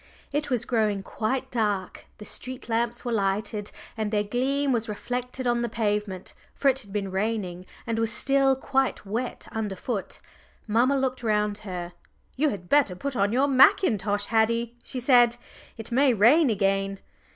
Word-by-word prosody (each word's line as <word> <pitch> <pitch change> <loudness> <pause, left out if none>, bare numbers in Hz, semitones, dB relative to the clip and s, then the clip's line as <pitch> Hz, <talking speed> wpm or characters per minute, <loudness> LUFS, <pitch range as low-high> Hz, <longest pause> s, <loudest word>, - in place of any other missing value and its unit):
It 295 +1 -1
was 240 -3 0
growing 215 -5 0
quite 240 +6 -2
dark; 210 -5 -2
the 210 - -10
street 255 +3 -5
lamps 235 +1 -1
were 240 - -1
lighted 205 0 -1 0.3
and 220 -2 -2
their 210 -1 +1
gleam 270 +6 0
was 230 -2 0
reflected 250 +4 -4
on 240 -1 +1
the 235 - -1
pavement, 210 -4 -2 0.2
for 280 - +3
it 270 0 +1
had 200 -7 -13
been 195 -2 -3
raining 190 -3 -2 0.2
and 230 -1 -1
was 225 0 +1
still 270 +3 +2
quite 265 -3 -1
wet 230 +5 -4
underfoot. 205 -1 -4 0.5
Mamma 240 +6 +2
looked 260 -1 -1
round 210 -2 0
her. 180 -4 -6 0.4
"You 300 +3 +2
had 195 -8 -6
better 280 -9 +3
put 275 +8 -4
on 200 -1 +2
your 265 +4 +3
mackintosh, 215 - +4
Haddie," 230 +1 +1
she 255 - -5
said. 240 -2 +5 0.4
"It 225 +1 -9
may 260 0 +4
rain 255 +9 +5
again. 195 -1 0
225 Hz, 160 wpm, -26 LUFS, 205-255 Hz, 0.5 s, said